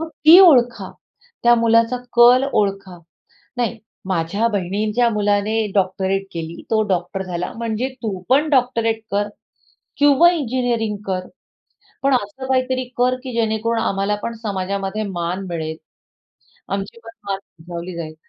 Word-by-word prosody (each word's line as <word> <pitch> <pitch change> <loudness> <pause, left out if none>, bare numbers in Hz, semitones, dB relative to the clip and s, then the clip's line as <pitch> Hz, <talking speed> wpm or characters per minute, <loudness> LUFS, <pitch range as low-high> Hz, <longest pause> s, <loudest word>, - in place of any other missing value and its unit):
मग 325 - -4 0.2
ती 330 +3 +10
ओळखा. 255 -9 +4 0.5
त्या 240 0 +6
मुलाचा 230 +1 +3 0.2
कल 245 +2 +7
ओळखा. 195 -3 -1 0.6
"नाही, 240 -1 -1 0.3
माझ्या 185 +6 0
बहिणींच्या 210 +5 0
मुलाने 205 0 0 0.2
डॉक्टरेट 190 0 0
केली, 165 0 -6
तो 220 -1 +3
डॉक्टर 185 +1 -2
झाला, 180 -1 -4
म्हणजे 230 +2 -2
तू 200 -4 -3
पण 290 +4 +3
डॉक्टरेट 230 -5 +1
कर 205 +1 0 0.7
किंवा 290 +4 +6
इंजिनिअरिंग 245 -7 -1
कर. 185 -1 -2 0.8
पण 275 0 +3
असं 245 +4 -4
काहीतरी 255 0 0
कर, 250 +1 +2
की 255 -2 -6
जेणेकरून 225 0 0
आम्हालापण 210 +2 -1
समाजामध्ये 200 0 -3
मान 175 +3 -3
मिळेल. 160 -2 -4 0.9
आमचीपण 200 +4 -5 0.2
मान 195 -1 -1 0.2
उंचावली 170 +1 -7
जाईल." 155 -2 -6
215 Hz, 125 wpm, -20 LUFS, 190-245 Hz, 0.9 s, ती